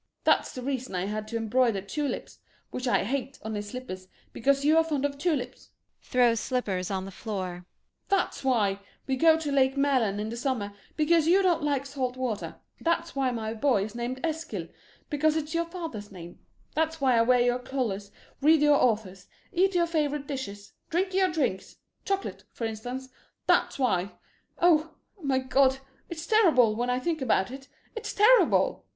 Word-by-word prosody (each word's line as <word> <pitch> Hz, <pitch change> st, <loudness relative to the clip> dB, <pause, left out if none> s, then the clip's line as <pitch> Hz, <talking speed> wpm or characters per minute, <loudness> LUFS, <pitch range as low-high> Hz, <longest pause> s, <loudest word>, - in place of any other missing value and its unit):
] -, -, -53 dB
That's -, -, +3 dB
the 255 Hz, -, -7 dB
reason 260 Hz, -5 st, -3 dB
I 180 Hz, +1 st, -1 dB
had 215 Hz, +1 st, -4 dB
to 230 Hz, +1 st, -3 dB
embroider 225 Hz, -1 st, +2 dB
tulips 285 Hz, +9 st, -4 dB, 0.3 s
which 255 Hz, 0 st, -4 dB
I -, -, +3 dB
hate 265 Hz, +4 st, -3 dB
on 220 Hz, 0 st, -4 dB
his 205 Hz, -1 st, -4 dB
slippers, 185 Hz, -7 st, -7 dB, 0.3 s
because 275 Hz, +3 st, +1 dB
you 310 Hz, +2 st, +5 dB
are 325 Hz, -, +6 dB
fond 295 Hz, -4 st, -1 dB
of 285 Hz, -1 st, -1 dB
tulips; 285 Hz, -6 st, -2 dB
that's -, -, -38 dB
why -, -, -31 dB
[Throws 240 Hz, -2 st, +3 dB
slippers 200 Hz, -8 st, -2 dB
on 190 Hz, -1 st, -2 dB
the 195 Hz, -, -8 dB
floor] 185 Hz, -4 st, -5 dB, 1.4 s
we 265 Hz, -, 0 dB
go 320 Hz, +4 st, +5 dB
to 310 Hz, -3 st, -3 dB
Lake 265 Hz, -1 st, +3 dB
Mälarn 260 Hz, -8 st, +2 dB
in 215 Hz, +1 st, -3 dB
the 235 Hz, -, -5 dB
summer, 235 Hz, -5 st, -2 dB, 0.2 s
because 320 Hz, +1 st, +3 dB
you 380 Hz, +3 st, +5 dB
don't 350 Hz, -3 st, +2 dB
like 285 Hz, -2 st, 0 dB
salt 260 Hz, -3 st, -3 dB
water; 245 Hz, -5 st, -3 dB, 0.2 s
that's 335 Hz, -1 st, -1 dB
why 270 Hz, -2 st, +1 dB
my 225 Hz, -2 st, -3 dB
boy 230 Hz, -3 st, +2 dB
is 210 Hz, +1 st, -6 dB
named 240 Hz, +2 st, -4 dB
Eskil 320 Hz, 0 st, -3 dB, 0.4 s
because 305 Hz, +1 st, +2 dB
it's 315 Hz, 0 st, -2 dB
your 335 Hz, 0 st, +1 dB
father's 325 Hz, -, -7 dB
name; 175 Hz, -2 st, -11 dB, 0.3 s
that's 320 Hz, +1 st, 0 dB
why 265 Hz, -3 st, +3 dB
I 230 Hz, -, +5 dB
wear 250 Hz, +1 st, +4 dB
your 245 Hz, +1 st, +2 dB
colors, 230 Hz, -7 st, -3 dB, 0.3 s
read 305 Hz, +1 st, +5 dB
your 295 Hz, -1 st, +5 dB
authors, 205 Hz, -6 st, 0 dB, 0.2 s
eat 375 Hz, +1 st, +2 dB
your 345 Hz, -1 st, +4 dB
favorite 295 Hz, -3 st, -1 dB
dishes, 235 Hz, -8 st, -6 dB, 0.2 s
drink 370 Hz, +3 st, 0 dB
your 375 Hz, -1 st, +3 dB
drinks 255 Hz, -, -2 dB, 0.3 s
chocolate, 390 Hz, 0 st, -2 dB
for 230 Hz, -, -4 dB
instance; 245 Hz, +4 st, -5 dB, 0.4 s
that's -, -, +2 dB
why 200 Hz, -7 st, 0 dB, 0.4 s
oh 325 Hz, -2 st, +3 dB, 0.3 s
my 275 Hz, -3 st, +1 dB
God 265 Hz, +1 st, +3 dB, 0.3 s
it's 330 Hz, -1 st, -6 dB
terrible, 320 Hz, -, +4 dB
when 240 Hz, +2 st, -1 dB
I 250 Hz, -, +1 dB
think 315 Hz, +2 st, -2 dB
about 225 Hz, -4 st, +1 dB
it; 270 Hz, +1 st, -9 dB, 0.3 s
it's 450 Hz, -, -5 dB
terrible. 460 Hz, +5 st, +4 dB
260 Hz, 180 wpm, -27 LUFS, 220-310 Hz, 1.4 s, are